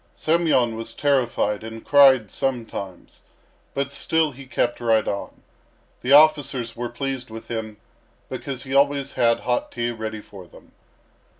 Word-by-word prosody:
Semyon 155 -8 +2
was 115 0 -6
terrified 120 -7 0
and 115 0 -9
cried 135 -7 +5
sometimes, 115 -8 -5 0.5
but 140 0 -2
still 160 +2 +1
he 135 0 -12
kept 120 -1 -1
right 115 -2 +2
on. 100 - -5 0.6
The 125 - -2
officers 140 -5 +4
were 120 0 -4
pleased 130 0 -4
with 115 +1 -10
him, 110 -2 -5 0.5
because 130 -2 -6
he 135 -1 -6
always 140 0 +2
had 115 -1 +2
hot 120 0 -1
tea 120 0 -2
ready 110 -1 -5
for 95 -3 -13
them. - - -18
120 Hz, 140 wpm, -23 LUFS, 115-140 Hz, 0.6 s, cried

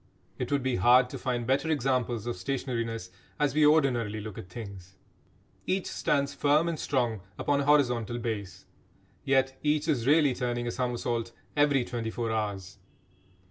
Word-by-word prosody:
It - - -3
would 140 -2 +1
be 130 -1 0
hard 125 +5 +5
to - - -6
find 120 -2 -2
better 135 +6 +1
examples 125 -6 0
of 120 - -2
stationariness, 115 +1 -3 0.3
as 145 -2 +2
we 150 0 +5
ordinarily 125 -8 +2
look 105 -2 -7
at 90 - -10
things. 95 -3 -9 0.7
Each 190 0 0
stands, 140 -1 0
firm 150 +3 +3
and 165 -3 -2
strong, 120 -7 0 0.2
upon 145 -1 +1
a - - -2
horizontal 125 -6 +2
base. 110 -5 -5 0.6
Yet 135 -1 +1
each 150 +1 +1
is 130 -6 0
really 145 -2 +5
turning 120 -1 -2
a 120 - -1
somersault 120 -2 -2 0.2
every 145 -4 +3
twenty 115 -2 -3
four 115 0 -3
hours. 100 -3 -3
125 Hz, 160 wpm, -28 LUFS, 115-140 Hz, 0.7 s, hard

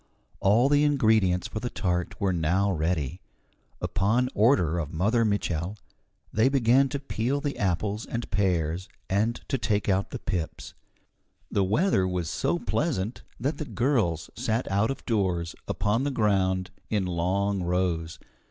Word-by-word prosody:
All 110 +7 +4
the 145 +1 +4
ingredients 110 -11 +3
for 110 - -5
the 120 - -3
tart 90 -5 -2
were 100 -3 +1
now 90 +5 +1
ready. 80 -1 -1 0.6
Upon 115 +6 +1
order 100 - +3
of 75 -2 -4
Mother 105 +8 +2
Mitchel 100 -3 -1 0.6
they 110 +5 +4
began 135 0 +4
to 140 - -3
peel 135 0 -1
the 145 -1 -3
apples 100 +2 -1
and 115 0 -4
pears 90 -3 0 0.2
and 110 +4 +1
to 135 - -1
take 105 -2 0
out 95 0 +1
the - - -5
pips. 85 -4 -4 0.8
The 100 - +2
weather 105 - +2
was 90 -3 -2
so 85 - 0
pleasant 110 - -1 0.2
that 140 +6 -2
the 155 - -3
girls 115 - 0
sat 115 +3 -1
out 100 +3 +2
of 135 - -5
doors, 90 -7 0
upon 105 +5 0
the 145 - 0
ground, 95 -6 +1 0.2
in 105 -3 0
long 95 +3 0
rows. 85 -2 -1
100 Hz, 150 wpm, -27 LUFS, 90-115 Hz, 0.8 s, All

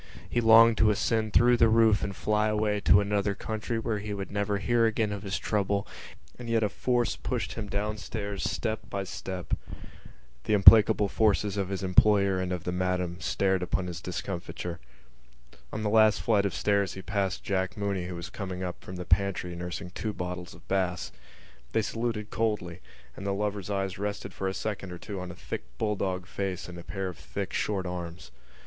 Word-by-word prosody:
He 120 - 0
longed 115 0 +7
to 110 - +5
ascend 110 +1 +1
through 120 +2 +5
the 115 -1 +5
roof 110 -2 +4
and 100 - -3
fly 105 +2 +1
away 105 -1 +1
to 100 0 +5
another 100 0 0
country 110 +2 -3
where 115 -2 -1
he 105 0 -4
would 100 -1 -5
never 100 0 0
hear 115 +3 +2
again 110 -1 0
of 100 -1 -4
his 100 -1 -2
trouble, 100 -1 0 0.5
and 120 -1 -7
yet 115 -1 +2
a 105 - +2
force 120 +2 0
pushed - - -3
him 105 -3 -5
downstairs 100 0 -3
step 110 -1 -1
by 100 0 -2
step. 95 -1 -6 0.9
The 105 - +3
implacable 105 0 +8
faces 105 -1 +2
of 100 -2 -1
his 95 0 -3
employer 100 0 +4
and 90 0 -2
of 90 -3 -3
the 90 - -2
Madam 90 -1 -1
stared 95 -1 +1
upon 90 +1 -1
his 90 -1 -6
discomfiture. 90 -1 -5 0.9
On 110 - -4
the - - +1
last 110 0 +5
flight 100 -3 +3
of 95 - -5
stairs 100 -2 +1
he 95 - -8
passed 100 -2 -1
Jack 95 -1 -1
Mooney 100 -3 -1
who 90 - -5
was 85 0 -7
coming 95 -2 -5
up 90 -1 -5
from 95 - -8
the 90 0 -5
pantry 90 -1 +1
nursing 90 0 -5
two 105 +2 -4
bottles 90 -1 -5
of - - -18
Bass. 90 -2 -1 0.6
They 110 - +2
saluted 115 -1 -3
coldly; 100 -5 -1 0.4
and - - -8
the 100 0 -1
lover's 105 -1 -2
eyes 95 -2 -2
rested 105 0 -4
for 95 - -3
a 95 - -2
second 100 -4 -4
or 90 - -6
two 100 +2 -6
on 90 0 -6
a 85 - -8
thick - - -5 0.2
bulldog 95 - -1
face 95 -1 -4
and 90 -1 -8
a - - -9
pair 95 0 -4
of 90 -5 -7
thick - - -5
short 100 -3 -1
arms. 90 -3 -6
100 Hz, 195 wpm, -28 LUFS, 90-105 Hz, 0.9 s, implacable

